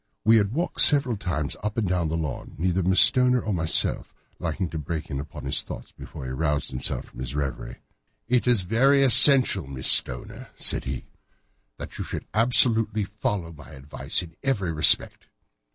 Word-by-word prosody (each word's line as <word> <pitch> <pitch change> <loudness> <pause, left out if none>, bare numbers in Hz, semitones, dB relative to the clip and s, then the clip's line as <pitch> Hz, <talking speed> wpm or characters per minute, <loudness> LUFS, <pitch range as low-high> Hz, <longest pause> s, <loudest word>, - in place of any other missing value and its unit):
We 115 +1 +4
had 100 -2 -1
walked 165 +8 -1
several 135 -5 +4
times 85 -7 -5
up 105 +1 -6
and 110 -4 -2
down 90 -3 -2
the 80 - -4
lawn, 75 -5 -7
neither 90 +2 -2
Miss 95 +2 +2
Stoner 125 +3 +2
nor 110 - -5
myself 80 -2 0 0.2
liking 85 +2 -5
to 80 - -6
break 80 +1 -7
in 70 - -5
upon 70 - -10
his - - 0
thoughts - - -11
before 65 - -12
he 65 - -7
roused 75 +2 -3
himself 65 0 -6
from - - -17
his 65 +2 -6
reverie. 70 -3 -7 0.4
"It 125 0 -1
is 120 -6 +1
very 135 +8 +1
essential, 130 - +3
Miss 65 -1 0
Stoner," 60 -1 0
said - - 0
he, 65 0 -7 0.7
"that - - -11
you - - -4
should - - -8
absolutely 115 -2 +3
follow 100 -4 -6
my 75 -3 -16
advice 70 +5 -3
in 85 -2 -14
every 100 -11 -3
respect." 75 - +6
90 Hz, 180 wpm, -23 LUFS, 75-115 Hz, 0.7 s, respect